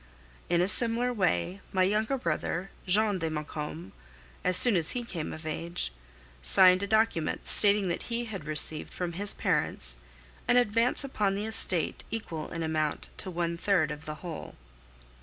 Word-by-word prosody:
In 175 0 +3
a 180 - +2
similar 235 +3 +4
way, 185 - 0
my 185 -1 +2
younger 215 +7 +1
brother, 175 -1 -3 0.2
Jean 205 +1 +2
de 165 -1 -2
Maucombe, 150 - -6 0.5
as 180 0 +3
soon 245 -5 +5
as 165 -3 0
he 240 - -3
came 170 -9 -5
of 160 0 -9
age, 165 - -2 0.5
signed 180 - +5
a 200 - -2
document 220 -7 0
stating 205 -1 +5
that 170 - -2
he 235 0 -2
had 195 -8 -7
received 155 0 0
from 175 -2 -3
his 200 +4 +1
parents - - -1 0.5
an 245 - +4
advance 235 +2 +2
upon 210 -8 -1
the 205 +2 -3
estate 185 -7 +1
equal 175 -8 -5
in 165 -1 -4
amount 155 -2 -2
to 190 - -1
one 170 -1 -2
third 170 -5 +1
of 150 +1 -8
whole. 155 +2 -7
180 Hz, 160 wpm, -29 LUFS, 160-210 Hz, 0.5 s, soon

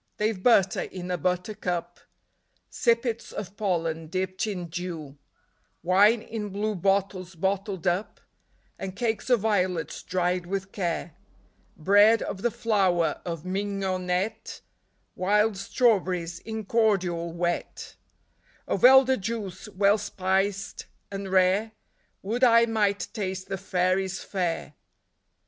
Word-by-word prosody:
They 215 +1 +1
've 185 - -11
butter 195 -5 +4
in 180 -1 -6
a 180 - 0
butter 180 +5 -1
cup; 175 -4 -4 0.7
Sippets 235 -1 0
of 200 -1 -7
pollen 165 -5 -1
dipped 185 +4 -2
in 185 -4 -3
dew; 165 -4 -6 0.7
Wine 205 +6 +4
in 220 -3 -5
blue 210 +2 -2
bottles 190 -1 -1
bottled 190 +1 -2
up; 180 +4 -1 0.6
And 190 -1 -5
cakes 225 +1 -2
of 245 -4 +4
violets 185 -6 0
dried 180 -1 -1
with 195 0 -3
care; 175 -4 -3 0.6
Bread 205 +7 +5
of 190 - -5
the 240 - +2
flour 190 -7 +1
of 165 -2 -5
mignonette; 190 0 -2 0.5
Wild 210 +3 +2
strawberries 185 -5 +1
in 220 -1 -6
cordial 185 -6 +1
wet 175 +1 -3 0.7
Of - - -2
elder 265 0 +7
juice, 205 -2 -5
well 205 +1 +3
spiced 195 +1 -1 0.2
and 195 -1 -5
rare 190 +4 +3 0.2
— - - -43
Would 230 +6 -2
I 230 -1 +6
might 205 -4 0
taste 190 -3 -4
the 195 - -2
fairies' 185 0 0
fare 175 -6 -3
195 Hz, 120 wpm, -26 LUFS, 180-210 Hz, 0.7 s, elder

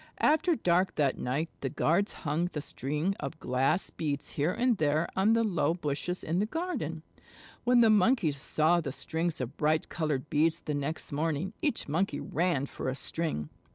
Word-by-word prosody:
After 320 +3 +3
dark 180 - +2
that 140 -3 +1
night 145 +7 -1
the 135 - -2
guards 175 +10 +1
hung 155 +4 +1
the 150 - -2
strings 150 +9 -2
of 135 -2 -5
glass 135 +8 +1
beads 145 -2 -3
here 150 +4 0
and 245 +4 +2
there 155 +1 +2
on 200 +4 +4
the 230 0 +3
low 170 -6 +1
bushes 160 +2 -3
in 165 +3 0
the 210 - +1
garden. 245 - -3 0.6
When 245 0 +5
the 225 -2 +6
Monkeys 205 - +3
saw 160 +3 +2
the 140 -4 -4
strings 165 +4 -2
of 125 0 -5
bright 155 +1 +1
colored 150 -4 -2
beads 160 +3 +2
the 150 - -3
next 145 +3 -3
morning, 160 +5 -1
each 295 -7 0
Monkey 155 0 0
ran 165 -4 0
for 135 - -4
a 130 - -2
string. 140 - -3
160 Hz, 180 wpm, -30 LUFS, 145-190 Hz, 0.6 s, the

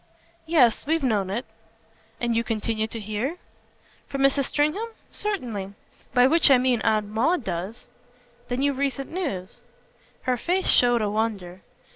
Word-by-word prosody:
"Yes, 275 -7 +3
we've 320 -1 +1
known 210 -7 +1
it." 225 +6 -3 0.7
"And 235 -1 0
you 230 - +2
continue 220 -1 -2
to 230 - -7
hear?" 215 - -3 0.7
"From 275 - -3
Mrs. 275 0 +3
Stringham? 305 - 0 0.2
Certainly. 225 - -4 0.4
By 245 0 +5
which 315 +3 +5
I 270 - +7
mean 250 -2 +1
Aunt 215 -1 +2
Maud 255 - +1
does." 190 +5 -5 0.6
"Then 250 +2 -1
you've 280 -2 +1
recent 275 -1 -2
news?" 245 - -4 0.6
Her 255 -1 +1
face 365 +9 0
showed 245 -2 +4
a 210 - 0
wonder. 200 -5 -2
245 Hz, 145 wpm, -25 LUFS, 215-280 Hz, 0.7 s, I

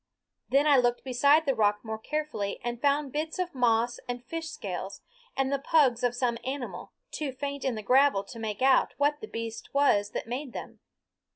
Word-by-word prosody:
Then 275 +3 +4
I 290 -2 +6
looked 245 -1 +2
beside 280 +5 +4
the 275 - +2
rock 210 -1 +1
more 220 0 -4
carefully 300 -7 -3
and 240 0 -4
found 285 -1 +1
bits 310 +3 -3
of 365 -1 -2
moss 240 -2 +2
and 245 0 -4
fish 325 +3 -5
scales, 195 -7 -6 0.4
and 270 +1 +1
the 280 - +1
pugs 270 -4 +3
of 245 0 +1
some 245 -2 0
animal, 265 -1 -5 0.2
too 295 -3 -3
faint 280 +1 -5
in 260 -3 0
the 215 - -6
gravel 260 -2 +4
to 230 +4 -10
make 220 +1 -3
out 265 -1 +4
what 290 +1 +1
the 435 - -6
beast 230 - -6
was 205 -8 +3
that - - -3
made 250 +2 -5
them. - - -8
255 Hz, 195 wpm, -28 LUFS, 230-285 Hz, 0.4 s, I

